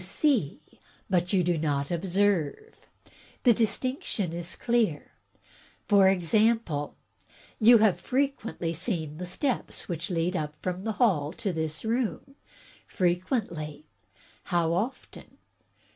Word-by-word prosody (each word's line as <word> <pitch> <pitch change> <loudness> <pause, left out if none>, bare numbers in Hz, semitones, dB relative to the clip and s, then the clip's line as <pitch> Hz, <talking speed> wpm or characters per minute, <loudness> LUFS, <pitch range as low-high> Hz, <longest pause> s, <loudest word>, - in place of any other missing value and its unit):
"You - - -4
see, 215 - +1 0.5
but 175 -1 +1
you 185 -3 +3
do 170 -1 +1
not 145 -2 -1
observe. 190 - 0 0.7
The 245 - +6
distinction 225 - -1
is 170 0 -4
clear. 230 -11 0 0.8
For 200 -2 +6
example 190 -4 +1 0.6
you 235 +1 +8
have 210 -5 +3
frequently 250 -10 -1
seen 160 -2 -3
the 180 - -4
steps 250 - -2
which 170 -1 -3
lead 175 +1 0
up 150 -3 -3
from 185 +2 -3
the 220 - -1
hall 175 - +2
to 195 0 -3
this 160 +3 -3
room." 240 +4 -2 0.5
"Frequently." 175 - -2 0.6
"How 170 -2 +1
often?" 220 +9 -5
180 Hz, 115 wpm, -27 LUFS, 165-225 Hz, 0.8 s, you